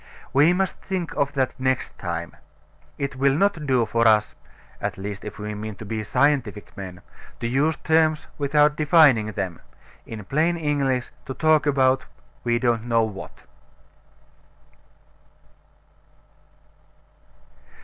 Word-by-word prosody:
We 150 Hz, +5 st, +5 dB
must 190 Hz, +1 st, 0 dB
think 185 Hz, -4 st, -4 dB
of 140 Hz, 0 st, 0 dB
that 130 Hz, -2 st, 0 dB
next 130 Hz, 0 st, -1 dB
time. 85 Hz, -1 st, -4 dB, 0.6 s
It 140 Hz, -1 st, -3 dB
will 135 Hz, 0 st, +3 dB
not 170 Hz, -4 st, +1 dB
do 125 Hz, -3 st, +3 dB
for 115 Hz, +1 st, +2 dB
us 105 Hz, -1 st, +3 dB, 0.5 s
(at -, -, -3 dB
least 100 Hz, +1 st, -6 dB
if 105 Hz, -, -7 dB
we 105 Hz, 0 st, -5 dB
mean 105 Hz, 0 st, -6 dB
to 110 Hz, -, -10 dB
be 110 Hz, +1 st, -3 dB
scientific 125 Hz, -4 st, 0 dB
men) 90 Hz, -3 st, -8 dB, 0.4 s
to -, -, -4 dB
use 140 Hz, +6 st, +1 dB
terms 160 Hz, -1 st, +2 dB
without 150 Hz, +1 st, +3 dB
defining 145 Hz, -9 st, +4 dB
them; 90 Hz, -4 st, -4 dB, 0.5 s
in 110 Hz, -3 st, -7 dB
plain 160 Hz, -, +1 dB
English, 140 Hz, -5 st, 0 dB, 0.2 s
to 130 Hz, -, -5 dB
talk 155 Hz, -1 st, +3 dB
about 130 Hz, -2 st, +2 dB, 0.4 s
we 120 Hz, -1 st, +1 dB
don't 120 Hz, -2 st, 0 dB
know 115 Hz, -1 st, +2 dB
what. 105 Hz, -3 st, -7 dB
130 Hz, 130 wpm, -24 LUFS, 110-150 Hz, 0.6 s, We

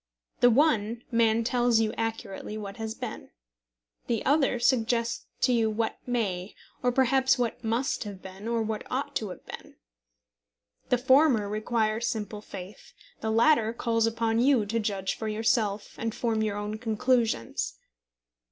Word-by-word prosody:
The 245 Hz, -, +6 dB
one 235 Hz, -4 st, +2 dB
man 230 Hz, -1 st, +3 dB
tells 240 Hz, -1 st, +2 dB
you 220 Hz, -1 st, +1 dB
accurately 225 Hz, -2 st, -4 dB
what 200 Hz, -2 st, -7 dB
has 220 Hz, -1 st, -4 dB
been. -, -, -7 dB, 0.8 s
The 230 Hz, -3 st, -1 dB
other 275 Hz, -3 st, +3 dB
suggests 235 Hz, -1 st, +1 dB
to 250 Hz, -, +4 dB
you 225 Hz, -2 st, +2 dB
what 220 Hz, +1 st, -2 dB
may, 200 Hz, -6 st, -2 dB, 0.3 s
or 250 Hz, -, +2 dB
perhaps 265 Hz, +1 st, +3 dB
what 240 Hz, -1 st, -2 dB
must 230 Hz, +5 st, 0 dB
have 200 Hz, -2 st, -7 dB
been, 190 Hz, +3 st, -9 dB
or 230 Hz, -1 st, 0 dB
what 220 Hz, -1 st, -3 dB
ought 265 Hz, +3 st, -3 dB
to 215 Hz, -, -4 dB
have 180 Hz, -, -10 dB
been. -, -, -10 dB, 1.1 s
The 250 Hz, -, +4 dB
former 260 Hz, -3 st, +4 dB
requires 220 Hz, +2 st, 0 dB
simple 210 Hz, -2 st, -3 dB
faith. 195 Hz, -1 st, -10 dB, 0.3 s
The 220 Hz, -, -2 dB
latter 225 Hz, 0 st, +4 dB
calls 230 Hz, -1 st, +1 dB
upon 225 Hz, 0 st, 0 dB
you 250 Hz, -3 st, +4 dB
to 230 Hz, +3 st, -1 dB
judge 200 Hz, -3 st, -1 dB
for 220 Hz, -, -5 dB
yourself, 215 Hz, -1 st, 0 dB
and 225 Hz, -1 st, -2 dB
form 225 Hz, -2 st, 0 dB
your 210 Hz, -2 st, -1 dB
own 210 Hz, +1 st, -4 dB
conclusions. 230 Hz, -, 0 dB
225 Hz, 150 wpm, -28 LUFS, 215-245 Hz, 1.1 s, The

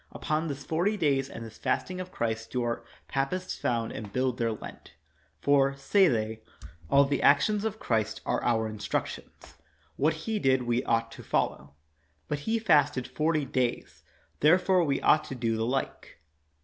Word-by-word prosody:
Upon 155 Hz, +2 st, -2 dB
this 140 Hz, -2 st, -5 dB
forty 180 Hz, +7 st, 0 dB
days 140 Hz, -6 st, +1 dB
and 115 Hz, -3 st, -8 dB
this 110 Hz, -, -12 dB
fasting 185 Hz, 0 st, -1 dB
of 185 Hz, 0 st, -8 dB
Christ 115 Hz, -4 st, -2 dB
do 125 Hz, -1 st, -1 dB
our 115 Hz, 0 st, -2 dB, 0.2 s
papists 160 Hz, +7 st, -2 dB
found 115 Hz, -2 st, -1 dB
and 105 Hz, -2 st, -7 dB
build 130 Hz, 0 st, -1 dB
their 115 Hz, -1 st, +1 dB
Lent; 110 Hz, -, -9 dB, 0.5 s
for, 140 Hz, -1 st, +3 dB
say 190 Hz, +7 st, +4 dB
they, 110 Hz, -4 st, -1 dB, 0.5 s
all 140 Hz, 0 st, +6 dB
the 140 Hz, 0 st, -1 dB
actions 200 Hz, +9 st, +4 dB
of 220 Hz, -1 st, -2 dB
Christ 110 Hz, -, -1 dB
are -, -, -1 dB
our 110 Hz, -2 st, +1 dB
instructions; 105 Hz, -1 st, -5 dB, 0.4 s
what 155 Hz, +3 st, +2 dB
he 220 Hz, -1 st, -1 dB
did 130 Hz, -6 st, +2 dB
we 120 Hz, +1 st, 0 dB
ought 115 Hz, -1 st, +1 dB
to -, -, -10 dB
follow. 70 Hz, 0 st, -2 dB, 0.5 s
But 150 Hz, -, -2 dB
He 230 Hz, -, +2 dB
fasted 145 Hz, -, +3 dB
forty 155 Hz, +3 st, 0 dB
days, 120 Hz, -, -2 dB, 0.4 s
therefore 180 Hz, +3 st, +4 dB
we 140 Hz, -4 st, 0 dB
ought 155 Hz, -, +4 dB
to 135 Hz, -, -6 dB
do 115 Hz, -2 st, -1 dB
the 110 Hz, +1 st, -1 dB
like. 135 Hz, +2 st, -3 dB
135 Hz, 170 wpm, -28 LUFS, 115-155 Hz, 0.5 s, all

